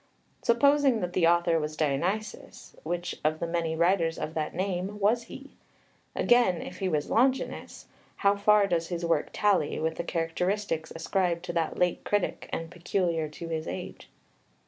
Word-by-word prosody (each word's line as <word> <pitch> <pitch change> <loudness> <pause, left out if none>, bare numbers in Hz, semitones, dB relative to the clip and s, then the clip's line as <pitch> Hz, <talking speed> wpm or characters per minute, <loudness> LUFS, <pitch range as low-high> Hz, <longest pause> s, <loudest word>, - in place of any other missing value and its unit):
Supposing 280 0 +4
that 180 0 -3
the 170 -2 +3
author 170 -1 +3
was 155 0 -4
Dionysius, 175 +9 -2
which 175 +2 -3
of 155 +1 +1
the - - -1
many 165 -1 -1
writers 170 -1 +2
of 155 - -4
that 155 -1 -3
name 190 +2 -2
was 230 +4 +2
he? 275 +4 -11 0.6
Again, 240 -8 +3
if 180 - -8
he 190 - 0
was 150 -3 -1
Longinus, 260 +3 0 0.3
how 200 -1 +3
far 205 0 +4
does 170 -3 0
his 175 -1 -3
work 165 - +1
tally 200 -7 +1
with 160 +1 -1
the - - -2
characteristics 165 +1 -2
ascribed 175 0 -1
to 175 - -4
that 165 -2 -1
late 180 -1 +1
critic, 205 -2 -1
and 165 0 -4
peculiar 170 -3 -1
to 165 +2 -8
his 160 -1 -3
age? - - -7
175 Hz, 165 wpm, -28 LUFS, 165-200 Hz, 0.6 s, Supposing